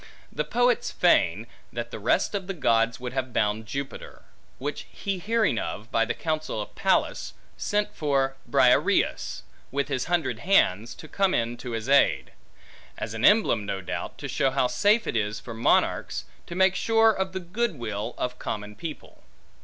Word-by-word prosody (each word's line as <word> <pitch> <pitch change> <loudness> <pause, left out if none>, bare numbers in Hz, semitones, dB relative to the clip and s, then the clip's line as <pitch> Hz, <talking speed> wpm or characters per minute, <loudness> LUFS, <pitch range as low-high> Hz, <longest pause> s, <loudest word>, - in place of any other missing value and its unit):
The 150 - -1
poets 245 +9 +1
feign, - - +3 0.3
that - - -5
the - - -6
rest - - +1
of 195 -3 -3
the 195 - -3
gods 115 -5 +2
would 125 0 -5
have 130 -1 -2
bound 105 +1 0
Jupiter; 140 +4 -6 0.3
which 145 +3 -5
he 195 -2 -3
hearing 215 - +1
of, 110 +3 -5
by 115 - +3
the 115 - -2
counsel 155 -7 -2
of 105 - -6
Pallas, - - 0 0.2
sent 205 0 -1
for 135 -3 +1
Briareus, - - +2 0.3
with 140 +2 -1
his 130 -3 -1
hundred 160 -10 0
hands, 115 - +2
to 155 - -11
come 195 +3 +1
in 115 +1 0
to 120 0 -6
his 115 +1 -3
aid. 140 +1 +3 0.7
An 115 +2 -4
emblem, 205 - +5
no 100 -1 -3
doubt, 90 - -5
to - - -6
show 135 - +1
how 135 -1 +1
safe 205 - +3
it - - -3
is 105 -1 -1
for 115 - -8
monarchs, 110 - +1 0.2
to 170 - -6
make 190 +1 +4
sure 225 +2 +4
of 190 -2 -2
the 190 - -2
good 190 +4 -2
will 110 -1 -4
of 125 0 -3
common 105 0 -4
people. 155 +8 -8
135 Hz, 175 wpm, -26 LUFS, 115-190 Hz, 0.7 s, emblem